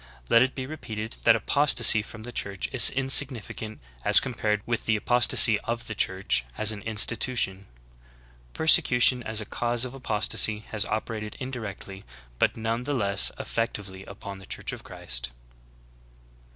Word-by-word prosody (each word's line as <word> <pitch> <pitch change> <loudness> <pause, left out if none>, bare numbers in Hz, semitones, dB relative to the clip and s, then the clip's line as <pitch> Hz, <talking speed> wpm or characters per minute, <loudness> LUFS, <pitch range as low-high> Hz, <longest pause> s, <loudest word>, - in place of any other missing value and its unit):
Let 115 - +4
it 130 +1 0
be 130 - -6
repeated 110 -7 -8
that 115 - +5
apos 140 +6 0
tasy 110 -2 +5
from 110 0 -13
the 120 - -9
Church 100 -4 -4
is 130 - +7
insignificant 130 -5 0 0.2
as 105 - +8
compared 105 -5 -3
with 115 -1 -4
the 110 - +1
apostasy 115 -1 +3
of 115 +2 -5
the 110 - -6
Church 95 - -1
as 110 0 +4
an 105 -1 -7
institution. 110 -2 0 0.9
Persecution 125 -5 +3
as 110 -2 -3
a - - -8
cause 120 +3 -2
of 125 - -9
apostasy 110 -3 0
has 110 -1 0
operated 110 -1 -6
indirectly 105 -7 -8 0.4
but - - 0
none 115 +1 -3
the 145 +3 -4
less 100 -5 +3
eggctively 100 -4 -5
upon 100 0 -10
the 95 - -15
Church - - -5
of - - -10
Christ." 60 0 -2
110 Hz, 150 wpm, -25 LUFS, 105-120 Hz, 0.9 s, as